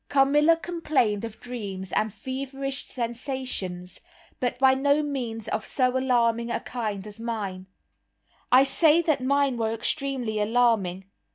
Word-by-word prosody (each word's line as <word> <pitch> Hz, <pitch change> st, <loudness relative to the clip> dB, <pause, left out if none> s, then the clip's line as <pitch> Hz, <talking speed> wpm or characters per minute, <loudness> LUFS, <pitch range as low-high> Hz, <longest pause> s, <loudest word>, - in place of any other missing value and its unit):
Carmilla 295 Hz, +4 st, +4 dB
complained 305 Hz, -, 0 dB
of 225 Hz, -1 st, -7 dB
dreams 200 Hz, -7 st, -6 dB
and 215 Hz, 0 st, 0 dB
feverish 270 Hz, +3 st, -4 dB
sensations, 235 Hz, -7 st, -4 dB, 0.4 s
but 245 Hz, -2 st, -1 dB
by 265 Hz, 0 st, +5 dB
no 285 Hz, +3 st, +2 dB
means 240 Hz, -7 st, -4 dB
of 215 Hz, -, -2 dB
so 255 Hz, -1 st, +1 dB
alarming 235 Hz, -3 st, +2 dB
a -, -, -1 dB
kind 215 Hz, -5 st, -4 dB
as 210 Hz, +1 st, -9 dB
mine. 205 Hz, -5 st, -4 dB, 0.8 s
I 255 Hz, +2 st, +8 dB
say 315 Hz, +4 st, +4 dB
that 310 Hz, -5 st, +1 dB
mine 280 Hz, -1 st, +2 dB
were 225 Hz, -1 st, 0 dB
extremely 250 Hz, -2 st, -1 dB
alarming. 210 Hz, -4 st, +1 dB
245 Hz, 130 wpm, -26 LUFS, 220-275 Hz, 0.8 s, I